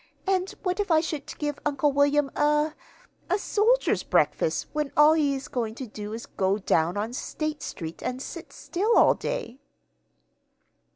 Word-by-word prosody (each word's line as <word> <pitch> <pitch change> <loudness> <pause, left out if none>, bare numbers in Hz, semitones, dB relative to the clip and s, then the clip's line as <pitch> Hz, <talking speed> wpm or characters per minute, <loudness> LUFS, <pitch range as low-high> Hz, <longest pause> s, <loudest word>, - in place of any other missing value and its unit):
And 380 -1 +1
what 365 +1 -1
if 410 - -1
I 320 -2 +5
should 310 -3 -4
give 295 -1 -3
Uncle 290 0 +1
William 285 0 +2
a 300 +1 +2 0.6
a 370 - +3
soldier's 445 +5 +2
breakfast - - +1
when 300 -2 -1
all 300 +1 +7
he 290 -3 +2
is 270 - -6
going 225 -3 -3
to 260 - -6
do 210 -2 -7
is 230 +1 -5
to - - -14
go 190 +1 +2
down 175 -3 +1
on 220 +3 -2
State 305 +3 -4
Street 165 -3 -6
and 255 - -3
sit 325 +5 -8
still 415 +6 0
all - - +6
day?" 275 - -5
295 Hz, 170 wpm, -26 LUFS, 245-335 Hz, 0.6 s, all